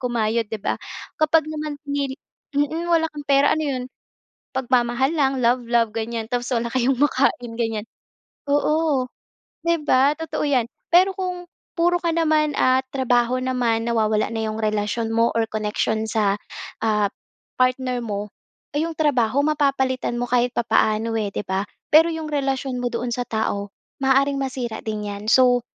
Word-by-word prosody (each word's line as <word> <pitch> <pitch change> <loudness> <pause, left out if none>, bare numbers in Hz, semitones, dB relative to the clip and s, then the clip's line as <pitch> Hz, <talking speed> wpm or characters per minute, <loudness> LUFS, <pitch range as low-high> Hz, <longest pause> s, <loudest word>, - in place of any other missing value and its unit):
kumayod, 230 -2 0
'di 220 -1 -5
ba? - - -1 0.4
Kapag 310 0 +3
naman 305 -1 -4
pinili 280 -2 -2 0.4
mm, 300 +4 0
wala 330 -1 +3
kang 295 -1 -8
pera, 280 0 +5
ano 315 - -1
'yon? 265 -4 -2 0.7
Pagmamahal 255 +1 +1
lang, 270 -3 +1
love 245 +1 +3
love, 230 -2 +2
ganyan 225 0 -3
tapos 245 +1 -2
wala 235 0 0
kayong 260 +1 +2
makain, 260 -4 +1
ganyan. 225 -2 -1 0.6
Oo, 290 -2 +1 0.6
'di 335 -2 +1
ba? 280 +1 +4
Totoo 325 0 -4
'yan. 255 -5 +2 0.2
Pero 365 +3 +6
kung 365 -2 -3 0.3
puro 350 +1 +2
ka 335 -1 -1
naman, 310 -3 +2
ah, 255 0 +4
trabaho 250 -2 +1
naman, 245 -3 0
nawawala 220 -2 +1
na 225 -1 -2
'yong 215 0 -4
relasyon 215 +2 -1
mo 230 +1 +3
or 230 - +3
connection 215 +1 -1
sa, 210 -2 +1 0.4
ah, 210 -2 +1 0.5
partner 255 0 +1
mo, 210 -2 -4 0.5
eh, 295 - +2
'yong 330 - -6
trabaho 260 -4 +2
mapapalitan 275 -5 +1
mo - - 0
kahit 245 0 +2
papaano, 225 -1 +1
eh, 205 -2 -2
'di - - -2
ba? 190 +1 0 0.3
Pero 320 +2 +7
'yong 320 -1 -4
relasyon 270 -2 -1
mo 245 - +1
doon 240 0 -3
sa 245 +1 -1
tao, 205 -2 -2 0.3
maaaring 275 +1 +3
masira 255 -4 -3
din 215 -1 -3
'yan. 200 0 -6
So, 250 -2 +5
255 Hz, 160 wpm, -22 LUFS, 225-285 Hz, 0.7 s, Pero